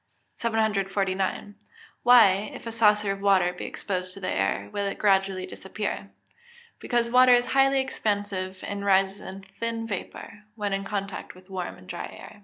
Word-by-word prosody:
749. 200 -3 -1 0.5
Why, 215 -5 +6
if - - -10
a 230 - -4
saucer 210 -2 +3
of 195 0 -5
water 190 -3 +3
be 180 - -7
exposed 185 -2 -3
to - - -9
the 185 - -3
air, 95 +1 0
will 200 0 -1
it 195 - -4
gradually 195 -2 +2
disappear? 200 +2 -5 0.7
Because 235 -1 0
water 255 0 +7
is 245 0 +4
highly 270 0 +3
expansive, 205 -6 -2
and 200 0 -4
rises 195 0 +2
in 190 +1 -9
thin 230 -1 -2
vapour, 210 0 -7
when 205 -3 -2
in 195 0 -2
contact 195 -2 -5
with 185 +1 -17
warm 185 -2 -4
and 95 - -16
dry - - -5
air. 215 - -12
200 Hz, 165 wpm, -26 LUFS, 190-220 Hz, 0.7 s, water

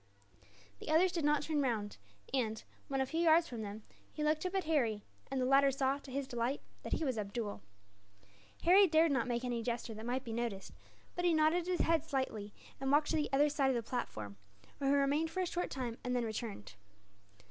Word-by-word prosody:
The - - -8
others 345 +4 +4
did 340 -3 -2
not 295 -1 +3
turn 300 -1 0
round 220 -6 -1 0.4
and, 220 -5 -1 0.2
when 270 -1 -1
a - - +2
few 320 +5 -3
yards 335 0 +5
from 235 -6 -6
them, 210 +1 -6 0.3
he 300 - -4
looked 305 +1 +1
up 365 - -5
at 380 - +1
Harry; 240 -10 +1 0.3
and 270 - -2
the 255 - +1
latter 275 +1 +5
saw, 270 +1 0
to 280 - -13
his 275 0 -2
delight, 240 +3 -1 0.2
that - - -4
he 320 - 0
was 255 -5 -1
Abdool. 205 - -4 1.0
Harry 380 +4 +7
dared 320 -1 +4
not 260 -4 +1
make 240 0 -1
any 240 -2 -1
gesture 235 0 -3
that 220 +2 -7
might 255 +2 -1
be 230 - -6
noticed; 230 -4 -3 0.4
but 355 - -3
he 345 -2 +4
nodded 315 +3 +3
his 360 -2 +1
head 330 -2 +2
slightly, 260 -9 -3 0.3
and 270 0 -1
walked 295 +1 +3
to - - +1
the 300 -1 0
other 285 +2 +4
side 285 -2 +1
of 265 - +1
the 235 -1 -3
platform, 105 - -4 0.4
where 275 - +1
he 280 - +4
remained 285 +3 +2
for 370 +3 -2
a - - +1
short 355 0 -2
time, 245 -3 -4
and 250 0 -1
then 245 -1 +1
returned. 220 - -5
270 Hz, 220 wpm, -34 LUFS, 235-315 Hz, 1.0 s, Harry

